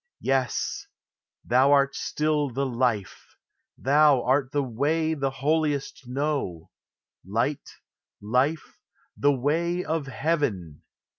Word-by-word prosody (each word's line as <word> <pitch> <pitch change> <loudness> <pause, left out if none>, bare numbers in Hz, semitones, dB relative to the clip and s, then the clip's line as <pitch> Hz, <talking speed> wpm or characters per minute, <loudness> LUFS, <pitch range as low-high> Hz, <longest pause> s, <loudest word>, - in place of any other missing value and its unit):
Yes; 130 -2 -1 0.6
thou 130 +4 +4
art 140 -1 +3
still 150 -1 0
the 135 +3 -2
Life, 120 -6 -2 0.4
thou 140 -2 +4
art 130 +1 +1
the 145 -1 0
Way 150 +6 0
The 135 -3 -1
holiest 145 -1 -1
know; 135 - -3 0.5
Light, 115 - -2 0.5
Life, 130 +9 -1 0.4
the 145 - +3
Way 165 +7 0
of 155 -3 -2
heaven! 125 - -2
140 Hz, 100 wpm, -26 LUFS, 125-150 Hz, 0.6 s, thou